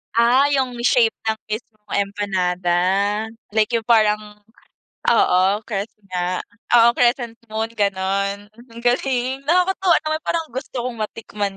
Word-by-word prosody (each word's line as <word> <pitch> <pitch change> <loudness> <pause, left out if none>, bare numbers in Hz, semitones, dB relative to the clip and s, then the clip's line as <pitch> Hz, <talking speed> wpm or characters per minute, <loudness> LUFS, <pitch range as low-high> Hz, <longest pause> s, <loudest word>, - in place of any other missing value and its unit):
Ah 240 +4 +5
'yung 255 -3 0
shape 235 -3 +3
ng 220 0 0
mismong 215 -1 -7 0.2
empanada, 185 -3 -2 0.8
like 215 +1 +1
'yung 230 - +2
parang 215 -2 +2 0.7
oo 180 - +4 0.2
crest 205 -1 -4 0.2
nga. 180 0 -2 0.3
Oo 235 0 +7
crescent 240 -1 0
moon 220 +1 -3
gano'n, 200 -1 -1
ang 235 0 -14
galing. 255 +1 0
Nakakatuwa 365 +1 +3
naman 310 0 -1
parang 330 0 -1
gusto 260 +1 -6
kong 240 -3 -5
matikman 210 -2 -4
225 Hz, 125 wpm, -21 LUFS, 205-245 Hz, 0.8 s, Oo